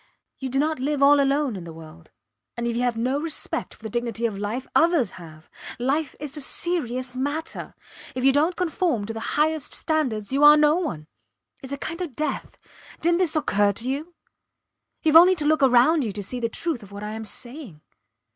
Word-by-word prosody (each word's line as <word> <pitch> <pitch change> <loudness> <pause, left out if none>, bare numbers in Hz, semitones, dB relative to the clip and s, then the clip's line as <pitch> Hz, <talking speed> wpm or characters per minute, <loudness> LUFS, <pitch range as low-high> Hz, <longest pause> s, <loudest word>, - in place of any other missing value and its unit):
You 265 - -4
do 265 - -2
not 310 +1 +1
live 280 +1 0
all 285 +1 +7
alone 280 -3 +1
in 185 - -7
the 170 - -9
world 160 0 -13 0.5
and 235 - -2
if 235 -1 -1
you 240 - 0
have 245 -2 0
no 255 +5 0
respect 320 -1 -3
for - - -24
the 220 - -5
dignity 235 -1 -2
of 220 -3 -1
life, 210 +6 -3
others 320 - +3
have. 155 -1 -13 0.3
Life 275 +4 -1
is 290 -1 -5
a 300 - -4
serious 255 -6 -2
matter. 285 +5 -4 0.4
If 255 - -3
you 270 - +7
dont 310 +6 +2
conform 330 - 0
to 225 - -5
the 225 - -5 0.2
highest 310 0 0
standards 260 -10 -1
you 280 +2 +2
are 295 +1 +9
no 300 0 +4
one 255 - -3 0.6
its 265 - -9
a 280 - -3
kind 330 +5 -5
of 320 -9 -5
death. 305 0 -3 0.4
Didnt 340 +1 +2
this 345 -4 +1
occur 205 -9 +2
to 230 +5 -3
you? 300 +6 -4 0.9
Youve 310 0 +3
only 360 +3 +8
to 305 -4 -3
look 310 0 +3
round 270 +4 +5
you 220 - -2
to 205 0 -5
see 245 +6 -4
the 230 -1 -1
truth 320 +1 -3
of 205 -1 -14
what 200 +1 -8
I 210 - -4
am 220 +1 -5
saying. 240 - -6
270 Hz, 210 wpm, -24 LUFS, 225-310 Hz, 0.9 s, are